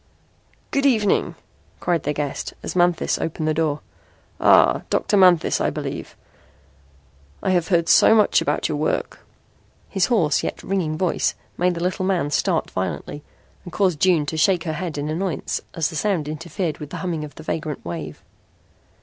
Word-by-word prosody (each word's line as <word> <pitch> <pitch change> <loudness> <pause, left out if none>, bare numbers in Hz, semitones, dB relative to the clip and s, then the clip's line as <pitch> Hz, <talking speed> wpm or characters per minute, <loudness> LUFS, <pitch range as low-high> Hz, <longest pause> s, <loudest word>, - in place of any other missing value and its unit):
"Good 275 0 +2
evening," 215 -6 +2 0.4
cried 175 -2 0
their 150 - -2
guest 145 -2 -4
as - - -5
Manthis 175 -1 +2
opened 160 -1 -3
the 155 - +2
door. 155 -2 0 0.6
"Ah, - - +5
Dr. - - +1
Manthis, 180 -4 +4
I - - +2
believe. - - -6 1.3
I 190 - +1
have 175 -2 +1
heard 170 -3 +2
so 220 - +6
much 210 -2 +4
about - - 0
your - - -2
work." - - -1 0.7
His 195 -3 +1
hoarse 175 - +2
yet - - -5
ringing 175 -5 -1
voice 180 0 0 0.2
made 180 0 +1
the 170 - -3
little 185 +1 -1
man 185 -6 0
start - - 0
violently 145 - -4 0.4
and 175 - -9
caused 185 -6 +1
June 175 -4 +3
to 160 +2 -4
shake 175 +1 +3
her 160 - -3
head 165 -1 -4
in 145 +1 -3
annoyance 165 +1 -2
as 160 -2 0
the - - -8
sound 175 -4 0
interfered 165 +1 -4
with 150 - -7
the - - -6
humming 165 -4 -2
of 145 -2 -9
the 160 - -10
vagrant 155 - -4
wave. 80 -3 -6
170 Hz, 170 wpm, -22 LUFS, 155-185 Hz, 1.3 s, so